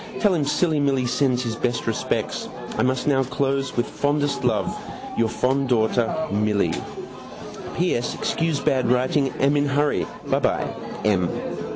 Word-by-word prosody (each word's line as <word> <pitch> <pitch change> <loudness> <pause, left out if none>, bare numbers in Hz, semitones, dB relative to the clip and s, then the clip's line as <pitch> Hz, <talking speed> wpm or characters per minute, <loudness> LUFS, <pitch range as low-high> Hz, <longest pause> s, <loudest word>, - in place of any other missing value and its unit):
Tell 205 -3 +4
him 155 -5 +1
silly 155 +1 +2
Milly 135 -3 +2
sends 125 0 +1
my 115 0 -4
best 120 -2 0
respects. 115 - -2 0.3
I - - 0
must 130 0 +1
now 140 -3 +3
close 135 +1 -1
with 120 - +2
fondest 145 0 0
love - - +1 0.4
Your 115 -1 +2
fond 130 +3 0
daughter 115 0 +2 0.2
Milly 105 0 +1 1.0
P. 180 +1 +2
S. 120 - -2
Excuse 165 -3 0
bad 130 -4 +1
writing 130 +3 +2
am 140 +2 +3
in 145 0 +2
hurry. 145 +1 +1 0.2
Byby. - - -1
M. 95 -5 +3
135 Hz, 150 wpm, -23 LUFS, 120-145 Hz, 1.0 s, Tell